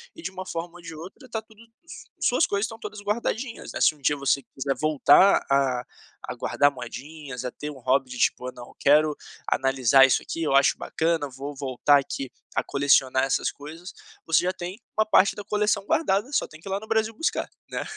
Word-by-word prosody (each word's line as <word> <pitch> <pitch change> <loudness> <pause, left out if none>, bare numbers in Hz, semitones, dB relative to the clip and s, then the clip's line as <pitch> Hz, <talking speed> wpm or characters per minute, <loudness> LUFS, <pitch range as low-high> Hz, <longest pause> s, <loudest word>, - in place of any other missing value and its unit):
e 330 - -11
de - - -4
uma 185 0 -7
forma 170 0 -5
ou - - -14
de 165 -1 -9
outra, 190 - -11
tá 220 - -3
tudo, 220 0 -20 0.2
s - - -11
suas - - +3
coisas 200 +1 0
estão 225 0 -8
todas 210 -1 -7
guardadinhas, 225 +3 -3
né. - - -5
Se - - +5
um 145 - -23
dia 145 +2 +1
você 140 0 +1
quiser 135 0 -3
voltar 155 +6 +5
a 135 -3 +2 0.4
a - - -3
guardar 145 0 +2
moedinhas. 135 0 -8
A 125 - -3
ter 150 - -7
um 145 - -9
hobby 130 +1 +1
de, 125 - -7
tipo, 125 - +1
"Ah, 125 - -4
não, 120 -1 -12
quero 150 +1 +4 0.3
analisar 135 0 +4
isso 130 - +1
aqui, 165 - -5
eu 150 -4 +1
acho 140 -1 +5
bacana, 160 -3 -1
vou 140 +2 -7
voltar 140 +1 +3
aqui 135 -1 -5 0.2
a - - +1
colecionar 135 -2 +3
essas 135 - 0
coisas". 160 +6 -10 0.3
Você 160 - +3
já 180 - +1
tem 185 +4 -7 0.2
uma 215 - +4
parte 200 -2 +4
da 205 - -7
coleção 210 -1 0
guardada. 245 -2 +1
Só - - +1
tem 155 - -14
que 180 - -13
ir - - -5
lá 195 - 0
no 220 - -12
Brasil 220 0 +1
buscar, 325 +9 -1 0.2
né. - - -3
155 Hz, 215 wpm, -25 LUFS, 135-200 Hz, 0.4 s, Se